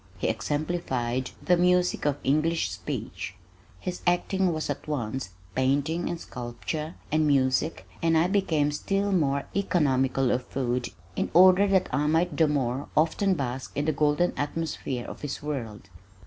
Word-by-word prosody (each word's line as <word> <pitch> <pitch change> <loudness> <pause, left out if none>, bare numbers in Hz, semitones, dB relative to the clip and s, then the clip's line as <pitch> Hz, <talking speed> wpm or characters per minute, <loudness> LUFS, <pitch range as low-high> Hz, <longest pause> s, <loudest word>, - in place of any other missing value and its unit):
He - - 0
exemplified 130 0 -1
the 180 - +4
music 180 -2 +2
of 145 -1 +1
English 155 +4 +1
speech. 95 - -5 0.4
His 180 -1 -5
acting 185 +1 +2
was 155 -1 -2
at 145 +1 -4
once 130 -6 -3 0.2
painting 145 +6 +1
and 170 - -3
sculpture 145 +6 -5 0.2
and 155 0 +3
music 135 +2 +1
and 165 -1 +3
I 160 - +4
became 170 -6 +1
still 195 +7 -1
more 140 -6 +2
economical 135 -9 +2
of 125 0 -1
food 125 -2 -1 0.3
in - - -1
order 185 +3 +7
that 190 -2 +3
I 145 +3 +2
might 165 +3 +2
the 160 - +4
more 135 -2 -1
often 185 +5 +3
bask 130 -3 -4
in 145 - 0
the 155 - +2
golden 150 +4 +2
atmosphere 145 -4 -3
of - - -8
his 145 -1 -5
world. 115 -9 -5
150 Hz, 150 wpm, -27 LUFS, 130-175 Hz, 0.4 s, order